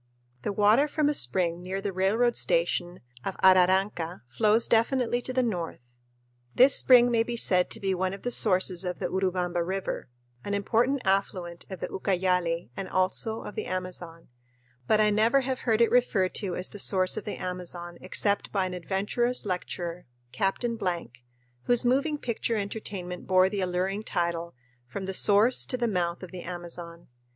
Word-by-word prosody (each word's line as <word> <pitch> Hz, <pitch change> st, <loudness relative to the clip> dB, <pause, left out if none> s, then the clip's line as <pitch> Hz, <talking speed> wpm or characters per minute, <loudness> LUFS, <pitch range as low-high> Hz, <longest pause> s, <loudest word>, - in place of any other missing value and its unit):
The 205 Hz, -, -2 dB
water 210 Hz, +8 st, +4 dB
from 295 Hz, 0 st, 0 dB
a -, -, +1 dB
spring 170 Hz, -, 0 dB
near 185 Hz, +2 st, -4 dB
the 195 Hz, 0 st, -4 dB
railroad 220 Hz, +6 st, +1 dB
station 180 Hz, -, 0 dB, 0.2 s
of 195 Hz, -, -4 dB
Araranca 185 Hz, -1 st, +3 dB
flows 220 Hz, +1 st, +3 dB
definitely 240 Hz, +1 st, +1 dB
to 255 Hz, -, -4 dB
the 255 Hz, 0 st, +1 dB
north. 175 Hz, -, -3 dB, 0.7 s
This 260 Hz, +2 st, +6 dB
spring 245 Hz, -1 st, +6 dB
may 230 Hz, -1 st, +3 dB
be 235 Hz, +1 st, -3 dB
said 180 Hz, -5 st, +3 dB
to -, -, -4 dB
be 195 Hz, -1 st, -1 dB
one 185 Hz, 0 st, -1 dB
of 195 Hz, -, -9 dB
the 245 Hz, -, -2 dB
sources 185 Hz, -4 st, +2 dB
of 180 Hz, -1 st, -4 dB
the -, -, -3 dB
Urubamba 180 Hz, -2 st, -1 dB
River, 190 Hz, -5 st, -4 dB, 0.3 s
an 200 Hz, -, -2 dB
important 235 Hz, +6 st, 0 dB
affluent 190 Hz, -3 st, -1 dB
of 190 Hz, -2 st, -8 dB
the -, -, -2 dB
Ucayali 180 Hz, -5 st, -1 dB
and 195 Hz, -, -6 dB
also 190 Hz, +4 st, 0 dB
of -, -, -8 dB
the -, -, -5 dB
Amazon, 180 Hz, -2 st, -5 dB, 0.6 s
but 215 Hz, -, +3 dB
I 210 Hz, 0 st, +4 dB
never 225 Hz, +6 st, +3 dB
have 260 Hz, -1 st, -3 dB
heard 225 Hz, -2 st, +1 dB
it 235 Hz, -, +4 dB
referred 215 Hz, -7 st, +2 dB
to 190 Hz, -4 st, -1 dB
as 180 Hz, -, 0 dB
"the 205 Hz, -, -9 dB
source 185 Hz, -2 st, +4 dB
of -, -, -4 dB
the 210 Hz, -, -4 dB
Amazon" 175 Hz, -1 st, -6 dB
except 200 Hz, +2 st, 0 dB
by 195 Hz, -2 st, 0 dB
an 185 Hz, -, -5 dB
adventurous 205 Hz, +8 st, +1 dB
lecturer, 180 Hz, -3 st, -4 dB, 0.2 s
Captain 225 Hz, -, -1 dB
Blank, 170 Hz, -, -4 dB, 0.4 s
whose 245 Hz, 0 st, +4 dB
moving 280 Hz, +5 st, +1 dB
picture 235 Hz, -3 st, -2 dB
entertainment 200 Hz, -4 st, -5 dB
bore 185 Hz, 0 st, +4 dB
the 200 Hz, -1 st, -3 dB
alluring 185 Hz, +3 st, -1 dB
title, 170 Hz, -4 st, -3 dB, 0.3 s
"From 190 Hz, +10 st, -6 dB
the 190 Hz, -, -4 dB
Source 210 Hz, +6 st, +4 dB
to 255 Hz, -, -2 dB
the 240 Hz, -1 st, 0 dB
Mouth 175 Hz, -4 st, -2 dB
of 185 Hz, -, -9 dB
the 185 Hz, -2 st, -7 dB
Amazon." 170 Hz, -1 st, -8 dB
190 Hz, 175 wpm, -27 LUFS, 180-225 Hz, 0.7 s, This